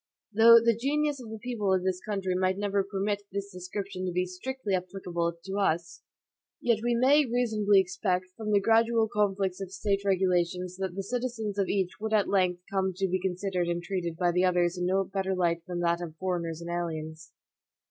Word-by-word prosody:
Though 230 Hz, +2 st, +8 dB
the 230 Hz, 0 st, +3 dB
genius 285 Hz, +3 st, 0 dB
of 230 Hz, -, -9 dB
the 220 Hz, -, -6 dB
people 215 Hz, -3 st, -2 dB
of 185 Hz, -1 st, +2 dB
this 185 Hz, -1 st, -1 dB
country 195 Hz, -3 st, -2 dB
might 185 Hz, +1 st, +1 dB
never 200 Hz, -1 st, 0 dB
permit 200 Hz, +1 st, -2 dB
this 200 Hz, +1 st, -4 dB
description 185 Hz, +1 st, -5 dB
to -, -, -1 dB
be 180 Hz, +1 st, 0 dB
strictly 205 Hz, +4 st, -4 dB
applicable 180 Hz, -2 st, -2 dB
to 195 Hz, +1 st, -4 dB
us, 170 Hz, -3 st, -1 dB, 0.6 s
yet 235 Hz, -3 st, +2 dB
we 240 Hz, +1 st, +1 dB
may 275 Hz, +5 st, +5 dB
reasonably 220 Hz, -4 st, +3 dB
expect, 185 Hz, 0 st, -1 dB
from 220 Hz, -2 st, -5 dB
the 205 Hz, -, +5 dB
gradual 225 Hz, +1 st, +3 dB
conflicts 195 Hz, -3 st, 0 dB
of 190 Hz, -1 st, -6 dB
State 200 Hz, 0 st, -1 dB
regulations, 180 Hz, -2 st, 0 dB
that 190 Hz, -2 st, -3 dB
the 195 Hz, -, -3 dB
citizens 225 Hz, -2 st, -3 dB
of 195 Hz, -, +1 dB
each 190 Hz, -3 st, 0 dB
would 220 Hz, +1 st, -3 dB
at 210 Hz, -2 st, +3 dB
length 180 Hz, -2 st, +1 dB
come 190 Hz, -1 st, 0 dB
to 195 Hz, +1 st, 0 dB
be 185 Hz, 0 st, -1 dB
considered 185 Hz, -1 st, -1 dB
and 175 Hz, 0 st, -2 dB
treated 175 Hz, -3 st, -3 dB
by 175 Hz, -1 st, +2 dB
the 180 Hz, +1 st, +2 dB
others 175 Hz, -1 st, +2 dB
in 180 Hz, 0 st, -1 dB
no 190 Hz, +1 st, +2 dB
better 190 Hz, 0 st, -2 dB
light 170 Hz, -2 st, +1 dB
than 175 Hz, -1 st, -3 dB
that 170 Hz, 0 st, +1 dB
of 165 Hz, -3 st, -6 dB
foreigners 170 Hz, -3 st, -3 dB
and 170 Hz, 0 st, -5 dB
aliens. 160 Hz, -2 st, -4 dB
190 Hz, 200 wpm, -28 LUFS, 180-210 Hz, 0.6 s, Though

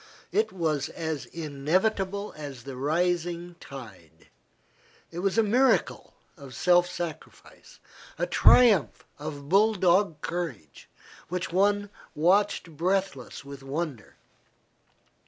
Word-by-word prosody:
It 435 Hz, +2 st, +1 dB
was 155 Hz, -6 st, -1 dB
as 160 Hz, -4 st, -4 dB
inevitable 185 Hz, +7 st, -1 dB
as 140 Hz, -5 st, -8 dB
the 135 Hz, -1 st, -7 dB
rising 175 Hz, +4 st, -1 dB
tide. 85 Hz, -, -12 dB, 0.8 s
It 170 Hz, -, -6 dB
was 195 Hz, +3 st, 0 dB
a 225 Hz, -, +5 dB
miracle 250 Hz, +5 st, +1 dB, 0.2 s
of 140 Hz, -4 st, -11 dB
self 175 Hz, 0 st, +4 dB
sacrifice, 175 Hz, -, -8 dB, 0.4 s
a -, -, 0 dB
triumph 220 Hz, -, +5 dB
of 145 Hz, -1 st, -7 dB
bull 210 Hz, +6 st, +4 dB
dog 180 Hz, -3 st, +2 dB
courage, 165 Hz, -, -5 dB, 0.4 s
which 180 Hz, 0 st, -3 dB
one 205 Hz, +2 st, +2 dB, 0.2 s
watched 180 Hz, 0 st, +2 dB
breathless 180 Hz, -7 st, -2 dB
with 140 Hz, -1 st, -9 dB
wonder. 135 Hz, -3 st, -5 dB
170 Hz, 105 wpm, -27 LUFS, 145-195 Hz, 0.8 s, a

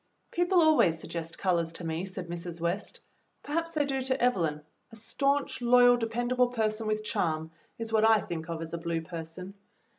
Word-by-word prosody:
"People 350 Hz, +1 st, +3 dB
always 300 Hz, -, +4 dB
suggest 165 Hz, 0 st, -6 dB
colors 170 Hz, -3 st, 0 dB
to 170 Hz, -, -6 dB
me," 165 Hz, +3 st, -2 dB
said 185 Hz, -2 st, -6 dB
Mrs. 170 Hz, 0 st, -6 dB
West. 170 Hz, +4 st, -3 dB, 0.4 s
"Perhaps 330 Hz, +3 st, -2 dB
they 300 Hz, -2 st, +1 dB
do 270 Hz, -1 st, -1 dB
to 260 Hz, +1 st, -1 dB
Evelyn. 165 Hz, -12 st, +1 dB, 0.3 s
A -, -, -11 dB
stanch, 275 Hz, +5 st, 0 dB
loyal, 245 Hz, 0 st, +6 dB
dependable 240 Hz, +2 st, +1 dB
person 220 Hz, -2 st, -1 dB
with 215 Hz, 0 st, -1 dB
charm 160 Hz, -5 st, -1 dB, 0.3 s
is 225 Hz, -1 st, -5 dB
what 220 Hz, -1 st, +4 dB
I 220 Hz, -1 st, +6 dB
think 165 Hz, -3 st, -5 dB
of 165 Hz, -1 st, -3 dB
as 165 Hz, -, -8 dB
a 170 Hz, -, -2 dB
blue 165 Hz, -1 st, -2 dB
person. 170 Hz, +3 st, -7 dB
215 Hz, 180 wpm, -29 LUFS, 170-245 Hz, 0.4 s, loyal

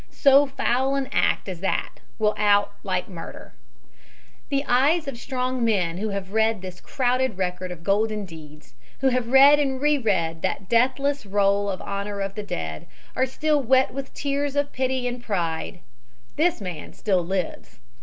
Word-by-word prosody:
So 280 Hz, +1 st, +5 dB
foul 265 Hz, 0 st, 0 dB
an 275 Hz, -1 st, -2 dB
act -, -, +1 dB
as 185 Hz, -3 st, -5 dB
that 190 Hz, -, -2 dB, 0.2 s
will 215 Hz, -1 st, +2 dB
out 205 Hz, -1 st, +3 dB
like -, -, -2 dB
murder. -, -, -9 dB, 1.0 s
The 275 Hz, 0 st, 0 dB
eyes 290 Hz, +6 st, +3 dB
of 275 Hz, -, -4 dB
strong 255 Hz, -1 st, -2 dB
men 185 Hz, -6 st, +1 dB
who 215 Hz, +2 st, -2 dB
have 200 Hz, -1 st, -5 dB
read 220 Hz, -1 st, +2 dB
this 185 Hz, -1 st, -8 dB
crowded 255 Hz, -4 st, 0 dB
record 180 Hz, -1 st, -3 dB
of 170 Hz, -2 st, -9 dB
golden 210 Hz, +2 st, 0 dB
deeds, 155 Hz, -5 st, -13 dB, 0.3 s
who 270 Hz, -, +4 dB
have 250 Hz, -2 st, 0 dB
read 280 Hz, +2 st, +8 dB
and 270 Hz, -2 st, 0 dB
re 295 Hz, +1 st, +2 dB
read 165 Hz, -8 st, 0 dB
that 195 Hz, -, -2 dB
deathless 265 Hz, +5 st, +1 dB
roll 200 Hz, 0 st, +2 dB
of 190 Hz, -, -4 dB
honor 200 Hz, 0 st, -4 dB
of 195 Hz, 0 st, -3 dB
the 210 Hz, -, -5 dB
dead, 80 Hz, -, -5 dB, 0.3 s
are 260 Hz, 0 st, +2 dB
still 300 Hz, +3 st, +1 dB
wet 260 Hz, +1 st, +3 dB
with 275 Hz, 0 st, -6 dB
tears 280 Hz, 0 st, -2 dB
of 285 Hz, 0 st, 0 dB
pity 260 Hz, -1 st, -1 dB
and 245 Hz, 0 st, -3 dB
of 240 Hz, -, -15 dB
pride. 175 Hz, -4 st, -3 dB, 0.5 s
This 320 Hz, -5 st, +1 dB
man 180 Hz, -5 st, -6 dB
still 190 Hz, -4 st, 0 dB
lives. 185 Hz, 0 st, -4 dB
225 Hz, 175 wpm, -24 LUFS, 190-265 Hz, 1.0 s, read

